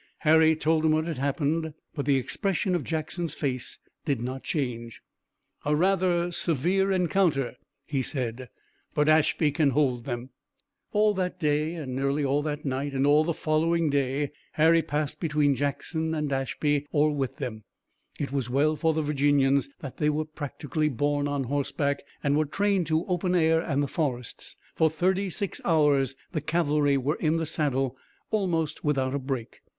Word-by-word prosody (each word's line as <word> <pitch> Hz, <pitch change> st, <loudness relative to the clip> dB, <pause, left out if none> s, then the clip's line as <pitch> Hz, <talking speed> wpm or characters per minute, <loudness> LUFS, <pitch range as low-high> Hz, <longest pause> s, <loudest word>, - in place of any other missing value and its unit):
Harry 160 Hz, 0 st, +5 dB
told 155 Hz, 0 st, +1 dB
him 155 Hz, -1 st, +4 dB
what 155 Hz, 0 st, +1 dB
had 165 Hz, -6 st, -4 dB
happened, 150 Hz, +3 st, -1 dB, 0.2 s
but 145 Hz, -3 st, -4 dB
the 140 Hz, -, +4 dB
expression 185 Hz, -, 0 dB
of 175 Hz, -4 st, 0 dB
Jackson's 160 Hz, 0 st, -3 dB
face 130 Hz, -4 st, -3 dB, 0.3 s
did 140 Hz, -6 st, 0 dB
not 130 Hz, +3 st, -4 dB
change. 120 Hz, -6 st, -3 dB, 0.6 s
"A 150 Hz, +1 st, +2 dB
rather 175 Hz, 0 st, +2 dB
severe 180 Hz, +5 st, +1 dB
encounter," 175 Hz, -8 st, +1 dB, 0.3 s
he 140 Hz, -2 st, -1 dB
said, 125 Hz, -2 st, -3 dB, 0.5 s
"but 150 Hz, 0 st, +2 dB
Ashby 155 Hz, 0 st, +3 dB
can 145 Hz, 0 st, +2 dB
hold 130 Hz, -4 st, +1 dB
them." 120 Hz, 0 st, -5 dB, 0.6 s
All 210 Hz, 0 st, +3 dB
that 185 Hz, -1 st, -2 dB
day, 155 Hz, +1 st, 0 dB
nearly 140 Hz, +3 st, -1 dB
all 140 Hz, +2 st, +2 dB
that 150 Hz, 0 st, -4 dB
night 135 Hz, +1 st, -2 dB
and 135 Hz, 0 st, +1 dB
all 145 Hz, +2 st, +5 dB
the 170 Hz, -, 0 dB
following 160 Hz, 0 st, +1 dB
day 140 Hz, +1 st, 0 dB, 0.2 s
Harry 165 Hz, +2 st, +5 dB
passed 150 Hz, -1 st, -3 dB
between 150 Hz, -3 st, +2 dB
Jackson 160 Hz, +4 st, -2 dB
and 150 Hz, -2 st, -1 dB
Ashby 145 Hz, +2 st, 0 dB
or 150 Hz, 0 st, +3 dB
with 135 Hz, -3 st, -2 dB
them. 110 Hz, -3 st, -5 dB, 0.6 s
It 140 Hz, -3 st, -3 dB
was 135 Hz, -4 st, -2 dB
well 145 Hz, +5 st, +2 dB
for 160 Hz, 0 st, +1 dB
the 160 Hz, -, 0 dB
Virginians 140 Hz, -1 st, +2 dB
that 135 Hz, -, -7 dB
they 150 Hz, -, +2 dB
were 155 Hz, +1 st, 0 dB
practically 150 Hz, 0 st, -3 dB
born 145 Hz, +2 st, 0 dB
on 145 Hz, -1 st, -1 dB
horseback 140 Hz, +2 st, -1 dB, 0.2 s
and 145 Hz, 0 st, +2 dB
were 155 Hz, +1 st, +2 dB
trained 195 Hz, +2 st, 0 dB
to 160 Hz, +2 st, +1 dB
open 180 Hz, 0 st, 0 dB
air 160 Hz, -1 st, +4 dB
and 145 Hz, -4 st, 0 dB
the -, -, -1 dB
forests. 130 Hz, -6 st, -3 dB, 0.2 s
For 160 Hz, -, +3 dB
thirty 185 Hz, +5 st, 0 dB
six 200 Hz, +2 st, -3 dB
hours 145 Hz, -5 st, +3 dB, 0.2 s
the 155 Hz, -, -2 dB
cavalry 150 Hz, -3 st, +2 dB
were 140 Hz, +4 st, -1 dB
in 160 Hz, 0 st, +1 dB
the 165 Hz, -, -1 dB
saddle 135 Hz, -5 st, -1 dB, 0.4 s
almost 165 Hz, -7 st, -1 dB
without 135 Hz, -3 st, +1 dB
a 140 Hz, -, 0 dB
break. 130 Hz, -3 st, -5 dB
150 Hz, 165 wpm, -27 LUFS, 140-160 Hz, 0.6 s, Harry